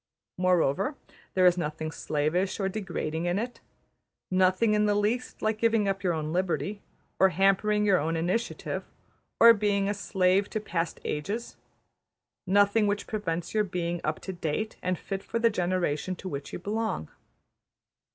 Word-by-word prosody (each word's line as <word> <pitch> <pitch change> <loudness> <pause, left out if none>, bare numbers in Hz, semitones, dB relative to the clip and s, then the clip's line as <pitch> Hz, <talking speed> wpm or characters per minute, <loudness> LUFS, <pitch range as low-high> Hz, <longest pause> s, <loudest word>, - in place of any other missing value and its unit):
Moreover, 185 - +2 0.4
there 185 -1 +4
is 180 0 +5
nothing 155 0 -3
slavish 160 +7 -1
or 195 - +1
degrading 175 -5 -3
in 175 +2 +1
it; 240 +4 -4 0.7
nothing 185 +4 +3
in 210 0 +3
the 205 - +2
least 220 +5 -1
like 220 0 0
giving 225 -2 +2
up 195 0 -1
your 180 -2 +1
own 155 -1 -3
liberty, 185 +2 -1 0.4
or 190 - +6
hampering 195 +4 +2
your 195 -3 +4
own 160 +2 -1
initiative, 185 +8 -2 0.6
or 230 0 +10
being 205 -2 +1
a 205 - +1
slave 195 -1 +1
to 215 - -2
past 170 -5 -3
ages; 205 +11 -3 0.9
nothing 205 +3 +4
which 205 0 -1
prevents 175 -5 -3
your 215 -1 +3
being 175 -3 -3
up 155 - -1
to 190 - -5
date 175 +5 -3
and 180 0 -1
fit 195 +3 -5
for - - -3
the 230 0 +3
generation 180 -2 -1
to 190 - -8
which 140 -5 -5
you - - -4
belong. 210 - -3
190 Hz, 160 wpm, -28 LUFS, 175-210 Hz, 0.9 s, or